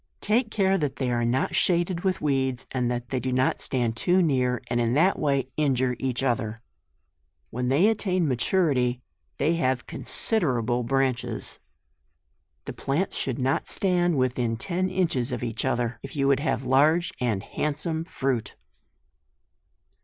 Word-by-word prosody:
Take 220 +3 +1
care 195 -2 +1
that 145 -3 -2
they 130 -2 -1
are 120 -1 0
not 120 +3 0
shaded 175 0 +1
with 190 -2 0
weeds, 130 -4 0
and 125 -2 0
that 120 0 -3
they 130 - -1
do 130 +2 -3
not 130 +1 +1
stand 120 -4 +2
too 180 +10 +2
near, 125 -5 +1
and 120 0 -1
in 120 +1 +1
that 180 +6 +3
way 140 -3 0
injure 130 -4 +1
each 130 -1 -1
other. 115 -4 -1 0.9
When 125 +1 -2
they 145 +10 +4
attain 185 -6 +1
maturity 125 -3 +1 0.3
they 160 +4 +1
have 130 -4 0
considerable 125 - 0
branches. 130 0 -1 1.1
The - - -6
plants 155 +8 -2
should 130 -3 -2
not 135 +4 0
stand 175 -4 +1
within 125 -3 0
ten 185 - -1
inches 165 -10 0
of 125 -1 -3
each 115 0 -2
other, 120 -3 -1
if 135 +1 -9
you 140 -1 +1
would 140 -1 +3
have 140 -3 -1
large 150 +7 +3
and 110 -6 -1
handsome 150 +2 -2
fruit. 130 - -2
135 Hz, 155 wpm, -25 LUFS, 125-165 Hz, 1.1 s, they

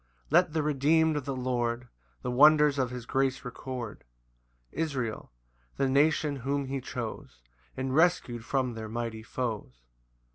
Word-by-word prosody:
2 - - -6
Let 175 -2 +5
the 160 -2 +1
redeemed 155 +2 +3
of 145 -3 -2
the 140 - -2
Lord 125 -1 -1 0.4
The 125 - -2
wonders 150 +2 +6
of 130 -2 +1
his 125 -1 -7
grace 135 +1 0
record; 125 -2 -6 0.7
Israel, 130 - -3 0.5
the 135 - +2
nation 145 +1 +2
whom 140 +2 -1
he 135 0 -3
chose, 115 - -6 0.3
And 130 0 -2
rescu'd 140 -7 +2
from 130 0 0
their 110 -1 -6
mighty 115 -1 -4
foes. 110 - -4
130 Hz, 145 wpm, -29 LUFS, 120-145 Hz, 0.7 s, wonders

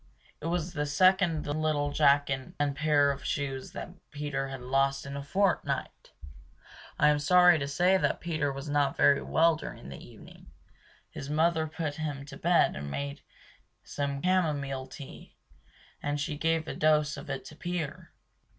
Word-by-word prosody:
It 160 - -4
was 170 0 -2
the 150 -2 -2
second 185 0 +3
little 145 -1 0
jacket 140 -3 +2
and 145 -1 0
pair 145 -1 +3
of 140 -1 -6
shoes 135 -2 -3
that - - -6 0.2
Peter 145 -2 -3
had 135 -1 -7
lost 135 +2 +1
in 140 0 -6
a 140 - -4
fortnight! 190 +7 -1 0.9
I 150 - +5
am 150 0 +2
sorry 180 +2 +6
to 140 - -2
say 180 +6 +3
that - - 0
Peter 155 -4 -1
was 135 +2 -7
not 145 -1 +1
very 140 - +5
well 165 0 +3
during 70 - -8
the 70 - -9
evening. - - -15 0.6
His 135 - -7
mother 160 +1 +2
put 155 -1 -4
him 145 -3 -4
to 145 - -10
bed 175 +1 +3
and 75 0 -6
made 140 - -4 0.6
some 140 -1 -3
camomile 145 -8 0
tea; 135 +1 -11 0.7
and 145 0 -2
she 145 +1 -2
gave 160 +1 0
a - - -3
dose 150 -1 +2
of 160 - -10
it 135 -1 -4
to 155 - -11
Peter! 175 -2 -5
145 Hz, 165 wpm, -29 LUFS, 140-160 Hz, 0.9 s, sorry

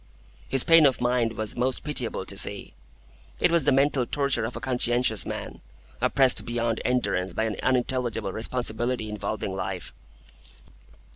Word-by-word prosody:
His 135 -1 +3
pain 165 -3 +7
of 130 - 0
mind 120 -2 +1
was 110 -1 -4
most 125 +1 -1
pitiable 125 -10 -1
to 100 - -3
see. 100 0 -2 0.7
It - - +3
was 170 -1 +3
the 145 - +4
mental 135 -2 +2
torture 140 -5 +1
of 115 - -5
a - - -4
conscientious 120 -2 +1
man, - - -6 0.4
oppressed 130 -2 +3
beyond 120 -1 -2
endurance 115 -7 0
by 110 - -1
an 110 -2 -2
unintelligible 125 -5 0
responsibility 120 0 -2
involving 105 -1 -4
life. 95 -2 -5
120 Hz, 145 wpm, -26 LUFS, 110-130 Hz, 0.7 s, pain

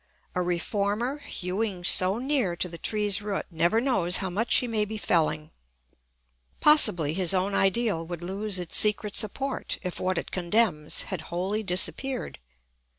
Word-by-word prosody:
A 180 - -1
reformer 205 - -2
hewing 190 -4 -4
so 185 +3 +4
near 255 -8 -1
to 180 - -2
the 170 -1 -9
tree's 210 -2 0
root 205 -1 -4
never 170 +7 +1
knows 200 -9 +2
how 190 -2 -3
much 220 +6 +1
he 250 - +1
may 220 -2 0
be 215 +1 -5
felling. 155 -5 0 1.1
Possibly 175 - +5
his 185 +1 +2
own 190 +2 -1
ideal 195 -3 +1
would 175 -1 -7
lose 195 +2 -2
its 175 -2 -4
secret 210 -1 +3
support 265 +5 -1
if 180 -2 -5
what 185 -1 -1
it - - -4
condemns 175 -4 +1
had 185 -4 -5
wholly 190 +5 -2
disappeared. 220 - -1
195 Hz, 150 wpm, -26 LUFS, 175-220 Hz, 1.1 s, Possibly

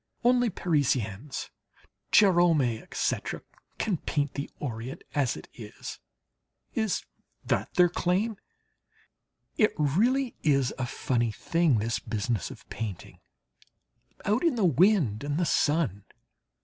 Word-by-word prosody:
Only 245 0 +4
Parisians 135 - -1 0.6
Gérôme, 170 - +4
etc. - - -2 0.4
can 205 -6 0
paint 145 -2 -1
the 140 +1 -4
Orient 125 -1 -5
as 140 -5 +1
it - - -10
is 110 -3 -9 0.7
is 220 -4 -1 0.4
that - - 0
their 180 -1 +6
claim? 185 +5 0 1.2
It 215 - +4
really 230 - +2
is 140 -4 +2
a 130 - -1
funny 120 -2 0
thing, 165 +3 +1
this 115 +2 -1
business 110 -1 -2
of - - -12
painting, 105 -6 -6 1.1
out 215 +8 +2
in 330 -6 +3
the 215 -5 +2
wind 165 - +3
and 145 +1 -1
the 175 - +1
sun. 145 - +1
150 Hz, 115 wpm, -28 LUFS, 120-190 Hz, 1.2 s, their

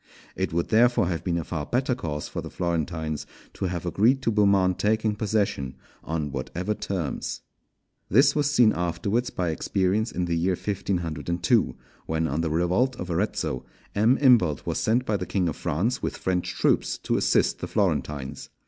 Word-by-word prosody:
It - - -1
would 85 +1 -1
therefore 115 -4 +4
have 85 -3 -2
been 85 -2 0
a 85 - -2
far 75 -2 -4
better 130 - 0
course 75 -11 -4
for - - -5
the - - -7
Florentines 80 -3 -2 0.3
to - - -3
have 90 -1 -3
agreed 120 +9 +2
to 115 - +2
Beaumont 100 -3 +3
taking 110 0 +1
possession 100 -11 -1 0.3
on 75 -3 -3
whatever 90 +9 -3
terms. 90 -8 -3 0.7
This 135 - +5
was 145 -1 +2
seen 125 -7 +5
afterwards 95 +8 -1
by 90 -2 -2
experience 100 +6 0
in 90 - -1
the 85 -1 -1
year 90 +3 +1
1502, 90 - 0 0.3
when, 80 0 0
on 75 +2 -1
the 80 - -1
revolt 90 +11 +1
of 90 -5 -5
Arezzo, 85 - -1 0.3
M. 110 +6 +4
Imbalt 115 - +4
was - - -1
sent 120 +3 +1
by 105 -4 +1
the - - -5
King 95 -3 0
of 80 - -2
France 100 - -1
with - - -3
French 90 -1 -1
troops - - +1
to - - -1
assist - - +2
the - - -4
Florentines. 70 -3 -1
90 Hz, 175 wpm, -26 LUFS, 80-110 Hz, 0.7 s, This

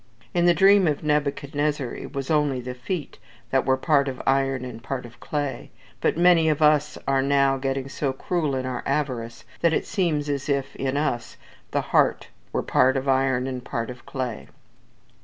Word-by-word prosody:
In 175 0 +3
the 175 - +5
dream 195 +1 +6
of 150 -1 -1
Nebuchadnezzar 145 -2 -1
it - - -8
was 135 +2 -3
only 145 -4 +2
the 125 0 -5
feet 150 +6 -5 0.3
that - - +1
were 130 0 +3
part 140 0 +2
of 130 -2 -4
iron 135 -1 +1
and 115 -2 -8
part 125 +1 -4
of 120 0 -14
clay; 145 -4 -3 0.3
but - - +1
many 170 -2 +5
of 150 - +1
us 150 -1 +3
are 135 -1 +3
now 140 0 +3
getting 135 0 -2
so 135 +1 -2
cruel 150 +1 -1
in 130 0 -2
our 125 -1 -3
avarice, 120 -6 -2
that 170 -1 +3
it - - 0
seems 165 -7 0
as 140 0 -2
if, 140 -1 -1
in 135 +1 -2
us, 145 -5 -2 0.3
the - - 0
heart - - +1 0.2
were - - -1
part 130 +1 +3
of 135 +1 -3
iron, 130 -1 +2
and 130 -2 -4
part 115 0 -3
of 125 -1 -12
clay. 125 -4 -4
135 Hz, 190 wpm, -24 LUFS, 130-150 Hz, 0.3 s, dream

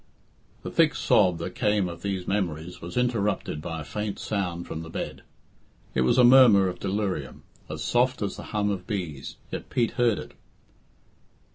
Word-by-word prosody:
The - - -5
thick - - +3
sob 90 -2 +3
that 85 - -5
came 105 -3 +1
of 85 -1 -8
these 95 -3 -3
memories 90 -4 -2
was 85 +5 -7
interrupted 105 -10 0
by 80 -1 -5
a - - -6
faint 105 +7 -4
sound 90 -4 -3
from 80 - -5
the 80 - -8
bed. - - -5 0.7
It 65 - +1
was 65 - +3
a 125 - +7
murmur 120 -6 +7
of 90 -1 -4
delirium, 100 -1 -3 0.3
as 75 0 -5
soft 125 - +1
as 100 - -2
the - - -8
hum 105 -1 0
of 95 -2 -5
bees, 85 -10 -4 0.2
yet - - -6
Pete 120 -2 +1
heard 120 -5 +2
it. - - -8
95 Hz, 175 wpm, -26 LUFS, 85-105 Hz, 0.7 s, a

